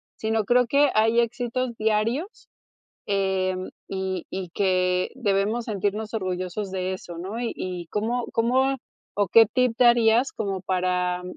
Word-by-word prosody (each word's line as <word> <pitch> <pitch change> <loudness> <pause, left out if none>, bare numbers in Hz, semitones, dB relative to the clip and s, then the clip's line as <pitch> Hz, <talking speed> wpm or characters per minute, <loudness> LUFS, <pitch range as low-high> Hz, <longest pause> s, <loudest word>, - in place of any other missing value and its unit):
Sino 220 -1 -1
creo 245 +2 +3
que 285 +3 +4
hay 225 +2 +4
éxitos 240 +1 -1
diarios, 220 - -1 0.6
em, 190 -2 -1 0.2
y 190 -2 -3
y 190 -1 -4
que 185 -2 +1
debemos 215 -1 0
sentirnos 210 +1 -2
orgullosos 185 0 -3
de 185 0 -2
eso, 175 -2 -9
¿no? 190 +6 -5
Y, 240 - -2
y 180 -2 -5
¿cómo 230 +3 -1
cómo, 260 +4 +2 0.4
o, 205 -2 +1
qué 225 +4 +7
tip 250 +1 +1
darías 240 +1 +4
como 195 -3 -3
para 180 -1 0
210 Hz, 135 wpm, -25 LUFS, 185-235 Hz, 0.6 s, qué